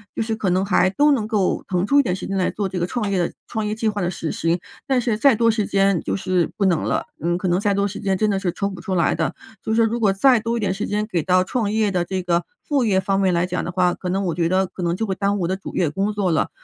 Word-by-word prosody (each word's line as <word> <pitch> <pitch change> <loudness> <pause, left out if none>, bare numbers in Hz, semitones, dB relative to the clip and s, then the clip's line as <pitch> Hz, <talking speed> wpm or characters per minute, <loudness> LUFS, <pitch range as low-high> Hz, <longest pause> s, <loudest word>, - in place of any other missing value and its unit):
就 - - -1
是 220 0 -2
可 210 -3 -1
能 185 +2 +1
还 190 -1 +3
都 290 +9 +3
能 230 -7 +1
够 210 -4 0
腾 180 0 0
出 280 +7 +4
一 - - +5
点 180 -7 -1
时 - - -6
间 195 - -3
来 185 -1 +1
做 205 -2 -2
这 190 -1 -4
个 175 - -1
创 210 0 -2
业 190 - +1
的 175 - 0 0.2
创 220 -2 -3
业 210 - -2
计 225 0 -1
划 210 -1 -1
的 175 - 0
实 165 -3 -4
行。 165 +2 0 0.3
但 265 -2 +2
是 235 -3 -1
再 275 0 +5
多 230 +1 +3
时 215 -2 -1
间 195 -3 +2
就 - - -2
是 185 -3 0
不 200 - +1
能 175 -5 +2
了， - - -1 0.2
嗯， 175 +1 +1
可 185 - -2
能 175 +1 +2
再 205 -1 +1
多 200 0 +1
时 205 - -7
间 195 -2 0
真 215 - +1
的 195 - 0
是 185 -2 -1
抽 200 - -2
不 185 -2 -9
出 190 - -3
来 170 - +3
的。 - - -1 0.3
就 220 - -2
是 230 +1 +4
如 225 +2 0
果 205 -4 +3
再 245 +5 +4
多 230 +2 -2
一 - - -2
点 200 - 0
时 205 +3 -3
间 210 +1 -1
给 180 -6 -1
到 185 +1 +3
创 205 +1 -1
业 215 -2 +1
的 180 -2 0
这 185 +1 -3
个 175 -1 0 0.2
副 280 -5 +1
业 195 -4 +3
方 195 0 0
面 190 -2 +2
来 170 +1 +2
讲 180 0 -3
的 - - -4
话， 180 -1 +2
可 185 - -7
能 195 +2 -1
我 175 - 0
觉 170 -2 +1
得 185 +2 +2
可 185 - -9
能 170 0 0
就 225 - -2
会 195 - -1
耽 200 +1 0
误 - - -3
我 170 - 0
的 190 - 0
主 195 - -9
业 170 - +1
工 195 +7 -1
作 200 -4 0
了， 160 - +1
195 Hz, 350 characters per minute, -21 LUFS, 180-215 Hz, 0.3 s, 一